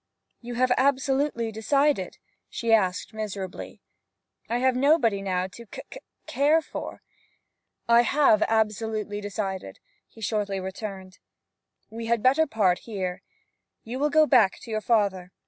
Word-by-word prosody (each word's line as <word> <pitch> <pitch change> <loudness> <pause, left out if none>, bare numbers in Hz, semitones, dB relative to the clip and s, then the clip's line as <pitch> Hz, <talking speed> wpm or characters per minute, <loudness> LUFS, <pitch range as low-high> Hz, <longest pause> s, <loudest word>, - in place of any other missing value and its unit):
'You 240 0 -7
have 255 +1 +2
absolutely 265 -3 +1
decided?' 275 +7 0 0.3
she 230 -1 -1
asked 195 0 +1
miserably. 200 -4 -6 0.7
'I 235 - 0
have 260 0 +2
nobody 255 -7 +3
now 185 -2 -1
to 235 +5 -13
c - - -8
c - - -9 0.3
care 295 +4 +3
for 320 - -8 0.4
' - - -54
'I 235 0 +6
have 260 -4 +3
absolutely 215 -1 -1
decided,' 195 - -5 0.3
he - - -18
shortly 205 -3 -2
returned. 190 0 -7 0.7
'We 225 +1 -6
had 235 -2 +1
better 275 +5 +4
part 200 -8 +2
here. 190 -5 -5 0.6
You 245 +3 -6
will 295 +1 +2
go 310 +1 +5
back 230 -9 +4
to 230 - -10
your 215 0 -1
father. 200 -6 0
225 Hz, 140 wpm, -26 LUFS, 200-255 Hz, 0.7 s, I